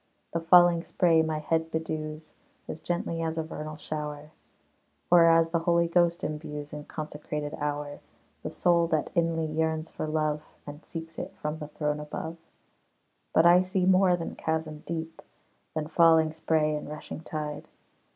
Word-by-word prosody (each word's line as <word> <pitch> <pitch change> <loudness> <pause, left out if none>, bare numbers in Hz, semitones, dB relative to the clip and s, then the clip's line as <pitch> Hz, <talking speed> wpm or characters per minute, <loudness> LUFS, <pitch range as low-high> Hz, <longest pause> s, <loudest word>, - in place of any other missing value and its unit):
The 165 - +1
falling 175 0 +6
spray 165 -3 +3
my 160 -1 -1
head 160 +1 0
bedews, 155 -1 -4 0.3
As 155 - -6
gently 170 -1 -2
as 165 0 -2
a 160 - 0
vernal 155 -1 -7
shower; 150 -1 -6 0.8
Or, 170 -1 +8
as 165 0 +4
the 170 - +2
Holy 170 0 +2
Ghost 170 0 +2
imbues 150 -1 -5
In 150 0 -7
consecrated 150 -1 -5
hour, 145 0 -3 0.4
The - - -4
soul 170 -1 +2
that 155 -2 0
inly 165 -2 +1
yearns 160 0 -1
for - - -4
love, 155 -1 0 0.2
And 145 +2 -9
seeks 165 -1 -8
it 190 - -6
from 150 +1 -3
the 150 - -6
throne 150 0 -2
above. 160 +2 -6 0.9
But 160 - +4
I 175 +1 +7
see 185 0 0
more 185 -1 +5
than 165 - -5
chasm 160 -1 -3
deep, 165 0 -5 0.5
Than 155 -1 -1
falling 160 -1 +5
spray 155 -1 +1
and 150 - -5
rushing 150 0 -7
tide. 150 -2 -5
160 Hz, 160 wpm, -28 LUFS, 150-165 Hz, 0.9 s, Or